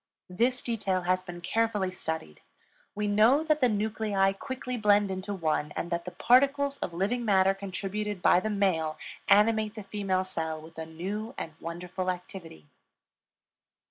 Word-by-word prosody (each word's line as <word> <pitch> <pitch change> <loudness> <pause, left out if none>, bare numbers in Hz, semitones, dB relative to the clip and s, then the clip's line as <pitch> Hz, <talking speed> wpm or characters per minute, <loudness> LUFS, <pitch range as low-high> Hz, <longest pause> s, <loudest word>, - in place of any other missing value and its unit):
This 240 +7 +1
detail 200 -6 -1
has 185 +1 +1
been 175 -1 -9
carefully 210 0 0
studied; 160 - -5 0.5
we 210 0 -1
know 220 +9 +4
that 305 -2 +1
the 250 - +5
nuclei 210 -2 +1
quickly 260 +2 -5
blend 205 -3 +3
into 190 +2 -4
one, 155 -5 -1
and 170 - -3
that 170 0 -2
the - - -4
particles 280 +2 +3
of - - -3
living 200 +8 -1
matter 195 -3 +4
contributed 200 +1 -4
by 175 - +5
the 215 - -2
male 180 -7 0 0.3
animate 215 +1 +4
the 215 - -7
female 195 -2 -1
cell 160 -4 -3
with 160 +1 -12
a 160 - -5
new 200 +9 -5
and 160 - -5
wonderful 180 +2 -4
activity. 175 - -7
195 Hz, 155 wpm, -29 LUFS, 180-220 Hz, 0.5 s, the